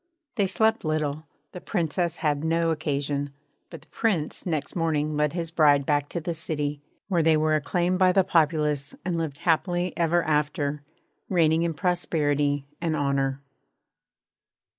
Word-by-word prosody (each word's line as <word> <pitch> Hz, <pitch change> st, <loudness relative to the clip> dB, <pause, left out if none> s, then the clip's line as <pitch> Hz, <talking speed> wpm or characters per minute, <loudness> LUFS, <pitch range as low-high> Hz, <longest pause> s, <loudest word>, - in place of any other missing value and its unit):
They 200 Hz, -5 st, +2 dB
slept 220 Hz, +4 st, +1 dB
little 155 Hz, -1 st, -2 dB, 0.2 s
the 180 Hz, -, -9 dB
Princess 170 Hz, -2 st, -1 dB
had 145 Hz, 0 st, +1 dB
no 165 Hz, 0 st, +1 dB
occasion; 145 Hz, -2 st, -2 dB, 0.4 s
but 165 Hz, -4 st, -10 dB
the -, -, -23 dB
Prince 185 Hz, -7 st, -1 dB
next 155 Hz, -4 st, -2 dB
morning 155 Hz, -3 st, 0 dB
led 150 Hz, 0 st, +1 dB
his 170 Hz, -2 st, -4 dB
bride 145 Hz, -4 st, +4 dB
back 145 Hz, 0 st, +1 dB
to 170 Hz, -, -3 dB
the 170 Hz, +1 st, -3 dB
city, 150 Hz, -3 st, -3 dB, 0.3 s
where 180 Hz, -4 st, +2 dB
they 160 Hz, -1 st, +4 dB
were 155 Hz, 0 st, +2 dB
acclaimed 175 Hz, +4 st, 0 dB
by 185 Hz, -1 st, +5 dB
the 190 Hz, +1 st, +4 dB
populace 150 Hz, -4 st, +1 dB
and 180 Hz, -2 st, -1 dB
lived 160 Hz, -4 st, -3 dB
happy 175 Hz, +2 st, 0 dB
ever 170 Hz, +1 st, +2 dB
after, 150 Hz, -1 st, 0 dB, 0.5 s
reigning 165 Hz, -3 st, +3 dB
in 170 Hz, -1 st, -1 dB
prosperity 145 Hz, -4 st, 0 dB, 0.2 s
and 165 Hz, -2 st, 0 dB
honour. 140 Hz, -1 st, 0 dB
155 Hz, 150 wpm, -26 LUFS, 145-170 Hz, 0.5 s, by